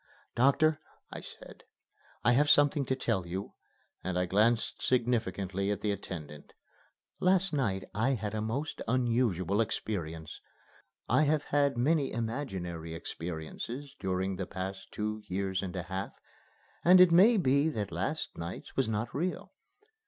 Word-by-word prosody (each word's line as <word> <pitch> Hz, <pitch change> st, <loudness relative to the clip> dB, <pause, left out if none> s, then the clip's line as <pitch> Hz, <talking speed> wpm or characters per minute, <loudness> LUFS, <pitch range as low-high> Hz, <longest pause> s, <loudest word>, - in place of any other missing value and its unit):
"Doctor," 145 Hz, +5 st, +3 dB, 0.3 s
I -, -, -6 dB
said, -, -, -12 dB, 0.6 s
"I 120 Hz, -, +5 dB
have 145 Hz, +4 st, +4 dB
something 145 Hz, -1 st, +5 dB
to 130 Hz, -, 0 dB
tell 110 Hz, -9 st, -1 dB
you," 95 Hz, +3 st, -5 dB, 0.5 s
and 95 Hz, 0 st, -2 dB
I 90 Hz, -, +2 dB
glanced 110 Hz, +5 st, +1 dB
significantly 100 Hz, -6 st, 0 dB
at 105 Hz, -1 st, -1 dB
the 105 Hz, -, 0 dB
attendant. 75 Hz, -7 st, -7 dB, 0.7 s
"Last 185 Hz, -1 st, +3 dB
night 105 Hz, -10 st, 0 dB
I 115 Hz, +6 st, +1 dB
had 105 Hz, -2 st, -4 dB
a 110 Hz, -, -1 dB
most 130 Hz, +8 st, -3 dB
unusual 115 Hz, -6 st, +1 dB
experience. 85 Hz, -8 st, -4 dB, 0.7 s
I 155 Hz, -, +4 dB
have 150 Hz, 0 st, +2 dB
had 140 Hz, -2 st, +1 dB
many 140 Hz, +3 st, +2 dB
imaginary 95 Hz, -, -4 dB
experiences 90 Hz, -, -6 dB
during 95 Hz, 0 st, -1 dB
the 95 Hz, -1 st, -3 dB
past 95 Hz, +1 st, -6 dB
two 105 Hz, 0 st, -3 dB
years 95 Hz, 0 st, -1 dB
and 95 Hz, -1 st, -5 dB
a 90 Hz, -, -3 dB
half, 95 Hz, +2 st, -4 dB, 0.7 s
and 180 Hz, +2 st, +8 dB
it 180 Hz, -1 st, +8 dB
may 205 Hz, +7 st, +7 dB
be 140 Hz, -3 st, +3 dB
that 105 Hz, -, -3 dB
last 95 Hz, -, -3 dB
night's 85 Hz, +2 st, -7 dB
was 135 Hz, -4 st, +1 dB
not 110 Hz, +2 st, -2 dB
real. 175 Hz, +6 st, -3 dB
110 Hz, 145 wpm, -31 LUFS, 95-140 Hz, 0.7 s, and